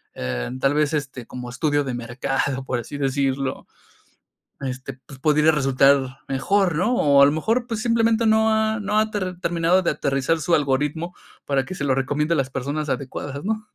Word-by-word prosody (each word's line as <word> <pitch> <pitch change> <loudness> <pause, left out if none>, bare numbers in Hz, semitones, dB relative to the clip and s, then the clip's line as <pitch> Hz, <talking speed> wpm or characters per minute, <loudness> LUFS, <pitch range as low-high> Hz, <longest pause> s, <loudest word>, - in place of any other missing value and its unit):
eh, 65 - -3
tal 135 +1 +2
vez, 150 0 +1
este, 135 -5 -3
como 125 -1 -7
estudio 145 +3 0
de 130 -2 -4
mercado, 130 +2 -2
por 125 -2 -1
así 120 +5 -7
decirlo, 135 -1 -1 1.0
este, 130 0 -6
pues 135 -2 -13
pudiera 150 +2 +4
resultar 135 -2 +3
mejor, 180 +6 +1
¿no? 185 +10 +1
O 140 -9 +4
a - - +9
lo 140 - +4
mejor, 225 +11 0
pues 225 -3 -3
simplemente 230 0 +2
no 220 0 +4
ha 220 0 +1
no 210 +1 +1
ha 215 0 +1
ter 185 -3 -3
terminado 175 +1 +2
de - - +2
aterrizar 140 +4 0
su 175 +2 0
algoritmo 150 +5 -1 0.3
para 140 -1 +1
que 185 - -7
se 140 - -3
lo 130 - +2
recomiende 145 +4 0
a - - 0
las 135 -1 0
personas 140 +3 -3
adecuadas, 140 +2 -4
¿no? 215 0 -2
145 Hz, 190 wpm, -22 LUFS, 135-180 Hz, 1.0 s, a